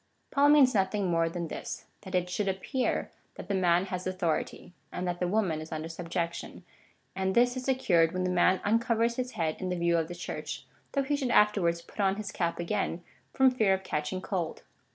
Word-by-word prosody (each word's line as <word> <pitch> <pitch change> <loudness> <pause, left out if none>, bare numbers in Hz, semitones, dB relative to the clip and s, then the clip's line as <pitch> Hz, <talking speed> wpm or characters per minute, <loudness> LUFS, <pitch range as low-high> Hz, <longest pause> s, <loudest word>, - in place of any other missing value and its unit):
Paul 285 +1 +4
means 280 -4 +6
nothing 195 -2 +1
more 165 0 +2
than 170 0 -4
this - - -6
— - - -41
that 190 -2 -6
it 180 -1 +1
should 200 +3 -2
appear 195 +7 -1 0.2
that - - -9
the 200 - -1
man 180 -1 +3
has 185 -1 -4
authority, 180 -1 -2 0.2
and 180 - -3
that 175 0 -2
the 180 - 0
woman 180 -5 0
is 155 - -9
under 155 0 -4
subjection, 170 +1 -4 0.5
and 190 0 -1
this 245 +1 +4
is 255 0 -5
secured 185 -11 +3
when 185 0 -2
the 180 - 0
man 180 +1 +3
uncovers 230 +2 +1
his 250 0 -3
head 160 -2 -1
in 185 - -3
the 180 - -1
view 170 0 +2
of 160 - -2
the 175 - -7
Church, 175 - -6 0.3
though 275 - +1
he 290 +2 0
should 270 -3 -1
afterwards 195 -7 +3
put - - -18
on 195 -1 +3
his 210 -1 -5
cap 170 -1 -1
again 175 -1 -2 0.3
from 265 -1 +4
fear 215 -6 +3
of 190 - -8
catching 150 +2 -2
cold. 175 -5 -3
185 Hz, 215 wpm, -29 LUFS, 170-215 Hz, 0.5 s, means